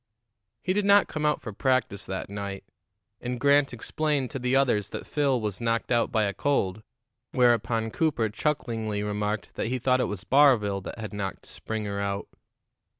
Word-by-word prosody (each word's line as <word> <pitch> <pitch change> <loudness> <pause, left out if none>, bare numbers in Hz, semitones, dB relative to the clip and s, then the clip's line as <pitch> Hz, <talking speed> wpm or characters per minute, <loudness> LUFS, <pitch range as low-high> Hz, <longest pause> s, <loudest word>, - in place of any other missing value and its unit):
He 185 - +1
did 205 +1 +1
not 200 0 +5
come 150 -1 -1
out 150 - +1
for 110 - -6
practice 130 -4 0
that 95 0 -4
night, 100 -1 -5 0.6
and 125 0 -4
Grant 140 +1 +4
explained 140 +2 -1
to 135 - -4
the 125 +1 +1
others 120 -7 +2
that - - -6
Phil 140 -4 +1
was 105 -1 -4
knocked 115 0 0
out 120 -1 +2
by 110 -2 +2
a 100 -1 0
cold, 100 -4 0 0.5
whereupon 115 -2 +2
Cooper 140 -8 +1
chucklingly 110 -4 -2
remarked 105 0 -2
that - - -2
he 130 +2 -1
thought 130 +1 +2
it - - +2
was 100 -2 -5
Barville 120 -9 +4
that - - -6
had 110 -2 -6
knocked 100 -2 -4
Springer 105 -2 -4
out. 100 0 -2
115 Hz, 175 wpm, -27 LUFS, 105-135 Hz, 0.6 s, not